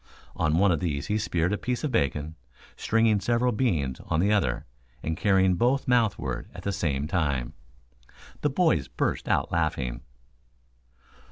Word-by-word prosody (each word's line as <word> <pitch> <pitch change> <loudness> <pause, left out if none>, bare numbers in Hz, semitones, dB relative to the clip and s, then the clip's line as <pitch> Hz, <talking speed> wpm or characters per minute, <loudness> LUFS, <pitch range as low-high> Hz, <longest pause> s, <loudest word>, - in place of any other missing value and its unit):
On 75 +1 +1
one 100 +1 +4
of 85 - +1
these 70 -5 -2
he 105 +1 0
speared 90 -3 0
a 105 - -2
piece 125 +2 -2
of 150 - -1
bacon, 75 - 0 0.4
stringing 115 -2 +2
several 120 +5 +1
beans 80 - 0
on 80 - 0
the 100 +4 +3
other, 70 -13 0 0.4
and 80 - -1
carrying 95 0 +3
both 125 +8 +1
mouthward 120 -5 0
at - - -9
the 100 - -1
same 75 -8 -1
time. 70 -8 -1 0.9
The 150 - +2
boys 135 - +2
burst - - -2
out - - +1
laughing. 75 -8 -1
90 Hz, 155 wpm, -26 LUFS, 75-115 Hz, 0.9 s, one